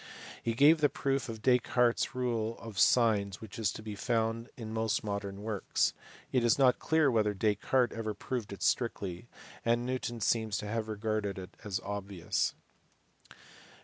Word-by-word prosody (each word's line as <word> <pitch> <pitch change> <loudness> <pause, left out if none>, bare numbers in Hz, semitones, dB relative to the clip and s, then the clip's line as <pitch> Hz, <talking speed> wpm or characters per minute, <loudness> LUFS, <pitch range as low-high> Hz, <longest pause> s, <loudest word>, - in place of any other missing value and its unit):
He 115 -1 -1
gave 150 +5 +6
the 145 - +5
proof 135 -1 -1
of 110 -1 -7
Descartes 125 -1 +3
s - - -18
rule 115 -3 -1
of 110 -3 -7
signs 105 -5 +3
which 110 +1 -9
is 105 -4 +1
to 110 - -8
be 110 -1 -5
found 115 +1 -1
in 110 -2 -6
most 110 -1 0
modern 100 -1 -4
works: 110 -3 0 0.4
it 125 -2 +2
is 120 - +4
not 130 -2 +4
clear 160 -3 +3
whether 105 -3 +2
Descartes 110 +5 +1
ever 110 -2 -3
proved 115 0 -4
it 95 -2 -6
strictly, 100 -5 -1 0.4
and 120 +1 +1
Newton 125 -2 -3
seems 110 -1 +1
to 105 - -5
have 110 +1 -2
regarded 110 -2 -2
it 95 0 -7
as 105 -1 -2
obvious. 100 -4 -2
110 Hz, 165 wpm, -31 LUFS, 105-120 Hz, 0.4 s, gave